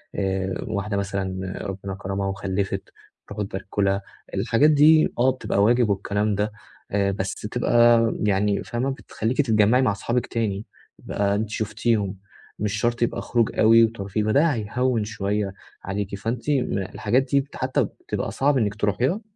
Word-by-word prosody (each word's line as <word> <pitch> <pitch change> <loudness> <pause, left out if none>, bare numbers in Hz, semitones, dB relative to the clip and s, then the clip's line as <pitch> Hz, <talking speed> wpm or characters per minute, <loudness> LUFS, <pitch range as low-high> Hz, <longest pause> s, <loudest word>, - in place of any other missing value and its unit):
آآ، 95 -1 -1
واحدة 100 -1 -2
مثلًا 95 -1 -3
ربنا 95 0 -5
كَرمها 95 0 -3
وخلّفِت 95 0 -3 0.3
تروحوا 105 0 -4
تباركوا 100 +1 -3
لها 100 0 +1 0.3
الحاجات 115 +8 +3
دي 155 +1 +5
آه، 130 +2 +5
بتبقى 105 -6 0
واجب 120 0 +3
والكلام 100 +1 0
ده 105 +2 -1 0.4
آآ، 100 -1 +1
بس 95 -1 -3
تبقى 120 +1 +3 0.2
يعني 100 0 +1
فاهمة 120 +3 -2
بتخليكِ 125 -3 -3
تتجمعي 110 -1 +3
مع 125 - +3
أصحابك 120 +4 -1
تاني 110 -3 -2 0.3
بقى 100 0 -1
أنتٍ 105 +1 -2
شُفتيهم، 105 -2 -1 0.4
مش 105 -1 -1
شرط 120 +3 0
يبقى 120 - 0
خروج 115 -2 0
أوي 115 +1 +7
وترفيه، 105 -2 -1
فده 125 +9 +3
هيهوّن 120 +1 0
شويّة 105 -1 -2 0.3
عليكِ، 100 +1 -3
فأنتِ 115 +6 -4
الحاجات 120 -2 0
دي 140 0 0
حتى 130 0 0
بتبقى - - -5
صعب 140 +1 +2
إنِّك 105 -4 0
تروحيها؟ 120 - 0
105 Hz, 145 wpm, -24 LUFS, 100-120 Hz, 0.4 s, أوي